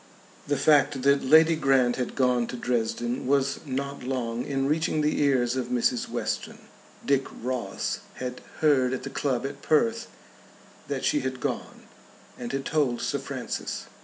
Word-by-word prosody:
The 145 0 +1
fact 140 -2 +3
that 140 0 +4
Lady 160 +4 +6
Grant 135 -4 +3
had 125 - -3
gone 125 -2 +2
to - - -6
Dresden 120 0 -1
was 140 0 +2
not 140 +1 -3
long 125 -2 -2
in 135 -1 -1
reaching 155 +1 +1
the 150 0 +1
ears 130 -4 +2
of 130 -2 -2
Mrs. 125 0 0
Western. - - -3 0.5
Dick 135 -1 +2 0.2
Ross 125 -1 -2 0.2
had 125 0 -5 0.2
heard 135 -5 +4
at 130 - -3
the 135 - -6
club 135 -3 -1
at 140 0 -6
Perth 230 +9 +2 0.8
that - - -2
she 300 - +3
had 130 -1 -3
gone, - - -4 0.5
and 120 -1 -6
had 135 0 -3
told 145 -6 +1
Sir - - -1
Francis. - - -5
135 Hz, 160 wpm, -26 LUFS, 125-140 Hz, 0.8 s, Lady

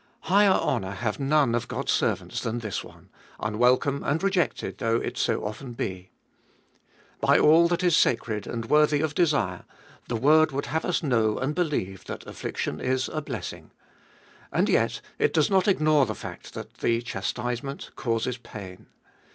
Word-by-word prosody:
Higher 200 +3 +4
honour 100 - +1
have 105 +4 -3
none 140 -3 +2
of 120 - -1
God's - - -2
servants - - 0
than 115 +1 -2
this 110 -4 -4
one, - - -16 0.3
unwelcome 125 +6 +2
and 160 +6 0
rejected 180 - 0
though 115 0 +1
it - - -2
so - - 0
often 120 +4 -6
be. 95 -5 -5 1.1
By - - +4
all 165 +3 +6
that 175 +1 -1
is 175 -3 +4
sacred 110 -3 +1
and 115 -1 -4
worthy 150 +3 +4
of 155 -1 -1
desire, 145 - +1 0.4
the 120 - -2
word 155 +6 +4
would 140 +1 -2
have 160 +2 -2
us 180 -1 0
know 115 -6 +2
and 135 +3 -1
believe 145 - -2
that - - -7
affliction 75 - -4
is 130 0 0
a 155 - -3
blessing. 145 - -6 0.8
And - - +1
yet - - +1 0.2
it - - +2
does 155 +4 +3
not 190 0 +3
ignore 155 -7 +4
the 110 - -3
fact - - -9
that - - -8
the 115 0 0
chastisement 120 +6 -4
causes 115 +1 -1
pain. 100 -6 -10
130 Hz, 165 wpm, -26 LUFS, 115-155 Hz, 1.1 s, all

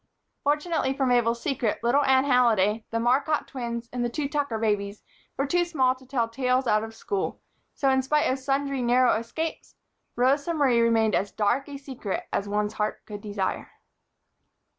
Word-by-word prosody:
Fortunately 295 -1 0
for 270 - 0
Mabel's 240 -2 +2
secret, 240 -6 -1
little 265 +5 +3
Anne 265 -1 +4
Halliday, 225 -5 +3
the 230 - -1
Marcotte 275 +6 +1
twins 235 -2 -5
and 245 -1 -1
the 240 - 0
two 280 +4 -2
Tucker 285 -5 -1
babies 205 -2 -1 0.3
were 275 - +1
too 350 +5 +2
small 270 -7 +2
to 260 0 -18
tell 245 -4 0
tales 255 +2 0
out 215 -2 +2
of 225 0 -8
school, 400 - -3 0.4
so 275 - 0
in 265 0 +3
spite 300 +3 +1
of 260 - 0
sundry 275 0 -1
narrow 245 +1 +4
escapes, 320 +8 -5 0.4
Rosa 280 +7 +2
Marie 260 -6 +3
remained 225 -2 +3
as 200 - 0
dark 240 +7 0
a 280 - -6
secret 260 -8 -5
as 200 - -1
one's 210 +1 -1
heart 210 0 -3
could 205 -1 -8
desire. 205 -2 -3
250 Hz, 175 wpm, -26 LUFS, 225-275 Hz, 0.4 s, Anne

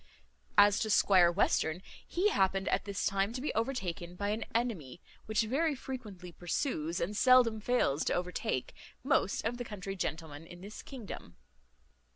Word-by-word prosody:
As 205 0 +6
to 220 - -1
Squire 185 -4 +5
Western, 175 -1 +1 0.2
he 380 +4 +2
happened 195 - +1
at - - 0
this 200 -1 -3
time 195 +1 +1
to 255 - -4
be 290 - -2
overtaken 185 -8 -3
by 200 +2 -2
an 220 +2 -2
enemy, 195 - -2 0.3
which 215 0 +2
very 285 +7 +1
frequently 215 -10 -8
pursues, 170 - -2
and 190 +5 -2
seldom 250 -2 +5
fails 205 - +1
to - - +1
overtake, 180 -7 -2 0.3
most 260 -8 +1
of 235 +2 -1
the 245 - -4
country 195 -4 -6
gentlemen 160 -3 -5
in 175 +1 -12
this 205 +3 -9
kingdom. 225 - -9
200 Hz, 160 wpm, -32 LUFS, 175-240 Hz, 0.3 s, As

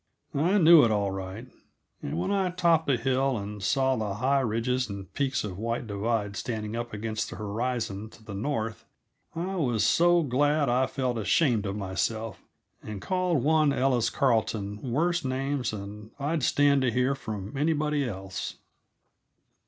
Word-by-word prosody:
I 170 +8 +2
knew 170 -3 +8
it, 115 - +4
all 100 -2 +1
right. 95 +5 -6 0.5
And 70 - -4
when 85 - -1
I 195 -2 +1
topped 170 -3 +2
a 135 - +3
hill 130 +1 +1
and 105 0 -6
saw 130 +5 +2
the 105 -4 -2
high 135 +5 +2
ridges 125 +1 0
and 100 -2 -8
peaks 135 -2 0
of 95 -3 -5
White 115 +2 -2
Divide 105 0 -1
stand 110 -1 -4
up 120 0 -4
against 110 +1 -3
the - - -7
horizon 110 -1 -3
to 110 - -17
the 105 - -7
north, 110 0 -3 0.5
I 185 +3 -3
was 120 - +1
so 175 0 +4
glad 145 +2 +2
I 130 +2 +2
felt 125 -3 -2
ashamed 110 -2 +2
of 100 - -3
myself 105 +2 -3 0.4
and 105 -2 -7
called 180 - 0
one 155 0 +4
Ellis 130 -3 +2
Carleton 110 -6 0
worse 165 +8 0
names 135 -1 -1
than 105 +1 -7
I'd 150 +3 -1
stand 140 +1 +3
to 130 - +2
hear 125 +3 +2
from 105 -6 -6
anybody 150 0 +1
else. 95 -2 -5
120 Hz, 160 wpm, -27 LUFS, 105-145 Hz, 0.5 s, knew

